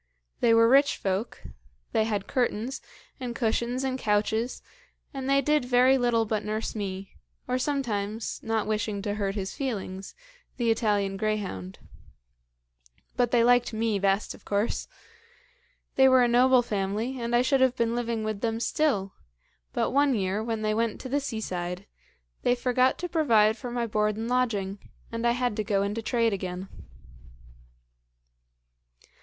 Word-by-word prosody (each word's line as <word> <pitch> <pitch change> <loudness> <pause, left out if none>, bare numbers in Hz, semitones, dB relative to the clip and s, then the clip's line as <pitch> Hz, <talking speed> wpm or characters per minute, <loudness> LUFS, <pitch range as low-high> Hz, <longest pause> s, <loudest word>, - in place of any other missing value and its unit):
They 235 - +4
were 230 0 +6
rich 275 +3 +4
folk; 195 +4 -3 0.5
they 220 - +2
had 205 -3 -2
curtains, 245 -1 -1 0.4
and 245 -2 -5
cushions, 240 +2 0
and 260 -1 -2
couches, 220 +3 0 0.5
and 270 -1 -4
they 275 0 +4
did 300 +1 +2
very 250 +1 +4
little 240 -3 +2
but 215 -1 -1
nurse 215 +1 -3
me, 195 -2 -5 0.4
or 250 +1 0
sometimes, 225 -6 -2
not 225 -1 -1
wishing 210 -2 -2
to 205 -1 -1
hurt 200 -1 -2
his 195 -2 -3
feelings, 195 -8 -5 0.4
the 235 -3 +2
Italian 205 -3 0
greyhound. 195 - -3 1.4
But 245 -1 +2
they 235 -1 +3
liked 245 0 +3
me 220 -2 0
best, 195 +1 +1
of - - -16
course. 205 +2 -1 1.1
They 265 0 +7
were 260 -1 +6
a - - +4
noble 250 +1 +5
family; 215 +4 -2
and 235 +1 0
I 240 - +4
should 270 0 +2
have 260 -1 +4
been 230 -2 0
living 235 -2 -2
with 215 -2 -3
them 225 -1 -1
still, 230 -8 0 0.6
but - - 0
one 280 -1 +3
year, 200 +1 -1
when 225 -1 -3
they 215 0 +1
went 225 0 -1
to 260 - -7
the 285 +3 +1
seaside, 185 -8 -4 0.6
they 245 - +2
forgot 255 +1 +2
to 355 - -4
provide 230 -11 +3
for 245 +1 -7
my 240 -1 -1
board 210 -1 0
and 225 +1 -3
lodging, 210 -6 0 0.3
and 230 +1 -1
I 235 - +3
had 245 -3 -1
to 215 - 0
go 200 -1 +1
into 205 +3 -2
trade 230 -1 +1
again. 185 0 -5
225 Hz, 160 wpm, -27 LUFS, 205-250 Hz, 1.4 s, They